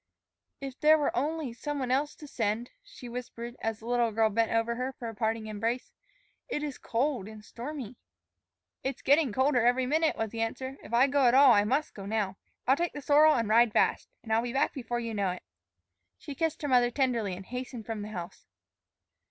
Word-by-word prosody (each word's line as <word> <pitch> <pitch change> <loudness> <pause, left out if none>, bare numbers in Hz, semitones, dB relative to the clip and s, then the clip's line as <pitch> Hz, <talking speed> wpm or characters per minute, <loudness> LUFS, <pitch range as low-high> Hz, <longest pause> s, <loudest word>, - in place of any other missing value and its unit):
"If 270 -1 -7
there 310 +1 +6
were 295 - 0
only 290 0 -1
some 295 +4 -4
one 255 -2 -2
else 285 +3 +1
to 300 - -11
send," 225 -1 -2
she 395 - -12
whispered 240 0 -7
as 225 -1 -2
the 220 - -14
little 240 -1 +1
girl 220 0 +2
bent 225 +2 +1
over 230 +1 +1
her 250 +2 -3
for 240 - -7
a - - -7
parting 220 0 -1
embrace. 225 +4 -3 0.6
"It 295 - -2
is 290 -3 -5
cold 245 -3 -1
and 215 -1 -11
stormy." 255 -1 -7 0.9
"It's 270 +1 -4
getting 285 -2 +4
colder 260 +1 +2
every 250 +2 +3
minute," 315 +4 +2
was 225 -2 -2
the 230 - -4
answer. 260 +4 -3
"If - - -12
I 240 +3 +5
go 280 -1 +3
at 240 - +4
all, 275 -1 +8
I 205 -2 +5
must 270 +7 0
go 195 -1 -8
now. 200 -3 -1 0.3
I'll 265 - +5
take 345 +2 -2
the 290 - -6
sorrel 300 +2 +6
and 230 -3 0
ride 225 +1 +4
fast. - - +2
And 220 - -2
I'll 225 - +4
be 240 0 -4
back 270 - +1
before 240 -2 -3
you 230 -1 -4
know 200 -3 0
it." 180 0 -5 0.7
She 285 - -8
kissed 315 +2 -2
her - - 0
mother 245 -2 +4
tenderly 240 -7 0
and 190 +1 -10
hastened 250 -1 -6
from 225 -2 -4
the 205 - -5
house. 175 -5 -8
245 Hz, 215 wpm, -29 LUFS, 225-275 Hz, 0.9 s, all